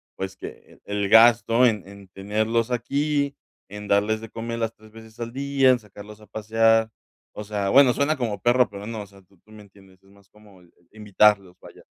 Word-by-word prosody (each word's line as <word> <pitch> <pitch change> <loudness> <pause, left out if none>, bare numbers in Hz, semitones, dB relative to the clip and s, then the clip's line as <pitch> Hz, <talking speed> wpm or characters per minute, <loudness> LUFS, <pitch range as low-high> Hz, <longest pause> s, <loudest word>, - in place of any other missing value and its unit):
pues, 95 0 -6
que - - -12
el 100 -1 -2
gasto 115 +2 +5
en 105 -5 -2
en 100 -1 -14
tenerlos 110 +5 -2
aquí, 140 +4 -1 0.3
en 105 0 -9
darles 105 +2 +1
de 115 - -10
comer 115 +1 -6
las 115 0 -2
3 110 0 -19
veces 110 +1 -15
al 115 0 -5
día, 140 0 +1
en 130 - +4
sacarlos 105 -1 -14
a - - -15
pasear. 110 +1 +1 0.5
O 105 - -6
sea, 105 -1 -3
bueno, 130 +1 +5
suena 150 +2 0
como 110 -6 -4
perro, 120 +3 +3
pero 100 +1 -9
no. 110 -2 -6
O - - -15
sea, 100 0 -19
tú 95 0 -29
me 110 -1 -13
entiendes. 95 -2 -21
Es 95 - -24
más 100 -1 -24
como 105 -3 -20 0.3
invitarlos. 105 -3 +1
Vaya. - - -16
110 Hz, 195 wpm, -23 LUFS, 100-115 Hz, 0.5 s, gasto